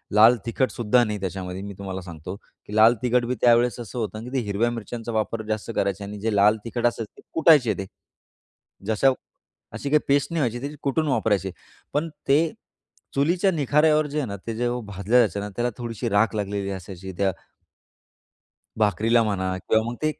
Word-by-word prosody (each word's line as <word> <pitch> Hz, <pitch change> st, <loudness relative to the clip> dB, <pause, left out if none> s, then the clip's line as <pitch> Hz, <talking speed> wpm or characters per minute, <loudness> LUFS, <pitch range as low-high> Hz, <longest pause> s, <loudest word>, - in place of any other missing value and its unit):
लाल 115 Hz, +3 st, +7 dB
तिखटसुद्धा 120 Hz, -1 st, +2 dB
नाही 105 Hz, -2 st, -2 dB
त्याच्यामध्ये. 95 Hz, 0 st, -4 dB
मी 100 Hz, 0 st, -7 dB
तुम्हाला 95 Hz, -1 st, -5 dB
सांगतो 90 Hz, +1 st, -8 dB
की 105 Hz, 0 st, -13 dB
लाल 110 Hz, +2 st, +7 dB
तिखट 125 Hz, 0 st, +2 dB
बी 125 Hz, +1 st, -1 dB
त्यावेळेस 120 Hz, 0 st, +4 dB
असं 120 Hz, +1 st, -6 dB
होतं 110 Hz, 0 st, -4 dB
की 125 Hz, -, -8 dB
ते 135 Hz, -, +2 dB
हिरव्या 105 Hz, +4 st, +1 dB
मिरच्यांचा 115 Hz, +1 st, -5 dB
वापर 110 Hz, +1 st, -1 dB
जास्त 110 Hz, -1 st, -3 dB
करायचे 100 Hz, +1 st, -1 dB
आणि 105 Hz, +1 st, -7 dB
जे 110 Hz, 0 st, -1 dB
लाल 105 Hz, +2 st, +5 dB
तिखट 120 Hz, +1 st, -2 dB
असायचं 115 Hz, -2 st, -4 dB
ते -, -, -14 dB
कुटायचे 150 Hz, -9 st, +5 dB
ते. 95 Hz, -, -4 dB, 1.0 s
जसं 120 Hz, +5 st, +3 dB, 0.6 s
अशी 140 Hz, -, -4 dB
काही 150 Hz, +1 st, +5 dB
पेस्ट 140 Hz, +4 st, +2 dB
नाही 165 Hz, -, 0 dB
व्हायची, 120 Hz, -2 st, -1 dB
ती 150 Hz, -, -10 dB
कुटून 150 Hz, +3 st, 0 dB
वापरायचे. 105 Hz, -, +1 dB, 0.4 s
पण 155 Hz, +3 st, 0 dB, 0.2 s
ते 140 Hz, +2 st, +5 dB, 0.8 s
चुलीच्या 175 Hz, +7 st, +2 dB
निखाऱ्यावर 150 Hz, 0 st, +3 dB
जे 145 Hz, +1 st, -5 dB
आहे 140 Hz, -, -2 dB
ना, 100 Hz, -, -5 dB
ते 115 Hz, -, -2 dB
जे 120 Hz, +2 st, 0 dB, 0.2 s
भाजलं 100 Hz, +4 st, 0 dB
जायचं 110 Hz, -4 st, +3 dB
ना, 105 Hz, +1 st, -4 dB
त्याला 120 Hz, +1 st, 0 dB
थोडीशी 120 Hz, -1 st, -4 dB
राख 105 Hz, +2 st, +2 dB
लागलेली 100 Hz, -1 st, -2 dB
असायची 95 Hz, 0 st, -7 dB
त्या 100 Hz, -1 st, +2 dB, 1.5 s
भाकरीला 110 Hz, +3 st, +3 dB
म्हणा 95 Hz, -3 st, -1 dB
किंवा 110 Hz, +4 st, +1 dB
मग 120 Hz, -, -5 dB
ते 155 Hz, -, +2 dB
एक, 150 Hz, -, -7 dB
115 Hz, 185 wpm, -24 LUFS, 100-125 Hz, 1.5 s, लाल